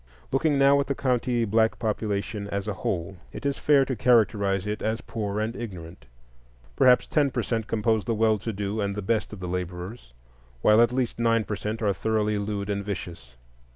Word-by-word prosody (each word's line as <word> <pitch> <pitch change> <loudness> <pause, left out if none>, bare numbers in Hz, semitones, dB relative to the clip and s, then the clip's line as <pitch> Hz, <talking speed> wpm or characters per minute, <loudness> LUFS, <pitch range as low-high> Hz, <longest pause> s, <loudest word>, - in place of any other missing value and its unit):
Looking 145 +2 +2
now 140 +1 +5
at 140 - -1
the 140 - -1
county 125 -2 0
black 110 +1 +2
population 105 -2 -2
as 100 0 -3
a 105 - -1
whole, 95 0 -3
it - - -9
is 140 -1 -1
fair 140 -2 +4
to 130 - -2
characterize 100 -5 +2
it 105 0 -3
as 110 +1 -1
poor 105 -2 -3
and 110 +2 -2
ignorant. 90 - -8 0.7
Perhaps 125 -1 +5
ten 145 -2 +2
per - - -2
cent 115 -2 -2
compose 110 -1 +1
the 115 - 0
well 110 -1 +2
to 115 - -4
do 100 +1 -3
and 100 -1 -2
the 105 - -4
best 110 +1 0
of 105 - -8
the 90 - -5
laborers, 90 - -5 0.5
while 105 +2 +6
at 120 0 +4
least 125 -2 -2
nine 115 -1 +2
per 105 - -3
cent 110 +2 -4
are 100 -2 +2
thoroughly 105 0 0
lewd 100 -1 -3
and 100 -1 -2
vicious. 85 -11 -7
110 Hz, 200 wpm, -26 LUFS, 100-115 Hz, 0.7 s, while